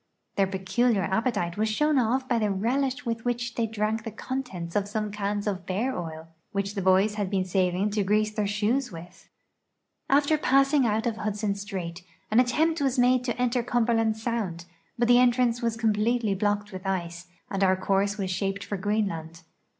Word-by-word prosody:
Their 195 Hz, -1 st, +3 dB
peculiar 195 Hz, +3 st, +1 dB
appetite 190 Hz, -3 st, -1 dB
was 215 Hz, +1 st, +1 dB
shown 300 Hz, +7 st, +2 dB, 0.3 s
by 240 Hz, -2 st, +1 dB
the 210 Hz, -2 st, +1 dB
relish 255 Hz, +7 st, -1 dB
with 230 Hz, -1 st, -2 dB
which 240 Hz, -1 st, -2 dB
they 230 Hz, -1 st, 0 dB
drank 220 Hz, 0 st, -1 dB
the 225 Hz, -, -4 dB
contents 220 Hz, -7 st, -5 dB
of 205 Hz, -1 st, +1 dB
some 210 Hz, 0 st, -3 dB
cans 205 Hz, 0 st, -2 dB
of 195 Hz, -3 st, -2 dB
))ear 230 Hz, +8 st, -1 dB
oil 160 Hz, -2 st, -6 dB, 0.3 s
which 200 Hz, 0 st, -1 dB
the 200 Hz, -, -3 dB
boys 190 Hz, +3 st, +4 dB
had 205 Hz, -3 st, -2 dB
been 190 Hz, -1 st, 0 dB
saving 185 Hz, +2 st, +1 dB
to 210 Hz, 0 st, 0 dB
grease 215 Hz, +2 st, +2 dB
their 210 Hz, -1 st, -1 dB
shoes 220 Hz, +6 st, 0 dB
w'ith. 175 Hz, 0 st, -12 dB, 0.8 s
After 290 Hz, +2 st, +3 dB
passing 275 Hz, -1 st, +3 dB
out 220 Hz, +2 st, 0 dB
of 230 Hz, -2 st, -1 dB
Hudson 210 Hz, -1 st, -1 dB
strait, 185 Hz, -4 st, -6 dB, 0.3 s
an 220 Hz, -, +5 dB
attempt 310 Hz, +6 st, +2 dB
was 270 Hz, -1 st, +1 dB
made 250 Hz, 0 st, +4 dB
to 240 Hz, -1 st, -2 dB
enter 250 Hz, 0 st, +1 dB
Cumberland 230 Hz, -2 st, +1 dB
sound, 220 Hz, -7 st, -3 dB, 0.3 s
l)Ut 240 Hz, -, +3 dB
the 245 Hz, 0 st, +6 dB
entrance 245 Hz, -1 st, +3 dB
was 230 Hz, -1 st, -1 dB
conipletely 220 Hz, 0 st, +1 dB
blocked 205 Hz, +1 st, -1 dB
with 190 Hz, 0 st, -7 dB
ice, 175 Hz, -2 st, -3 dB, 0.2 s
and 195 Hz, 0 st, 0 dB
our 190 Hz, 0 st, +4 dB
course 195 Hz, +2 st, 0 dB
was 190 Hz, -2 st, -2 dB
shaped 195 Hz, +1 st, -2 dB
for 200 Hz, -, -4 dB
(Jreenland. 170 Hz, -6 st, -2 dB
210 Hz, 180 wpm, -27 LUFS, 195-240 Hz, 0.8 s, the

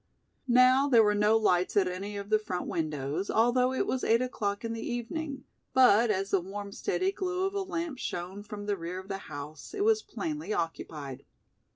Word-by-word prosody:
Now 255 Hz, +2 st, +5 dB
there 235 Hz, -4 st, +7 dB
were 210 Hz, -1 st, +3 dB
no 210 Hz, +2 st, +4 dB
lights 185 Hz, -3 st, +2 dB
at 190 Hz, -2 st, +4 dB
any 195 Hz, +3 st, -4 dB
of 200 Hz, +1 st, -7 dB
the 215 Hz, -, +5 dB
front 185 Hz, -4 st, -4 dB
windows, 155 Hz, +2 st, -2 dB
although 245 Hz, +3 st, +3 dB
it 260 Hz, -, 0 dB
was 260 Hz, -, -2 dB
eight 230 Hz, +2 st, +3 dB
o'clock 205 Hz, -4 st, -2 dB
in 230 Hz, -, -2 dB
the 225 Hz, -, -5 dB
evening, 275 Hz, +4 st, -4 dB, 0.3 s
but 240 Hz, -3 st, +6 dB
as 195 Hz, -1 st, 0 dB
the 195 Hz, -, +3 dB
warm 200 Hz, +2 st, -6 dB
steady 370 Hz, -, -1 dB
glow 370 Hz, -1 st, -2 dB
of 390 Hz, -, -2 dB
a 400 Hz, -, -1 dB
lamp 335 Hz, -7 st, -4 dB
shone 185 Hz, 0 st, -4 dB
from 205 Hz, 0 st, -8 dB
the 205 Hz, -1 st, -1 dB
rear 170 Hz, +1 st, -5 dB
of 190 Hz, +1 st, -9 dB
the 195 Hz, -1 st, -3 dB
house, 145 Hz, -, -8 dB
it 405 Hz, -, 0 dB
was 440 Hz, 0 st, +4 dB
plainly 310 Hz, -, -4 dB
occupied. 155 Hz, -5 st, -4 dB
215 Hz, 200 wpm, -29 LUFS, 190-260 Hz, 0.3 s, there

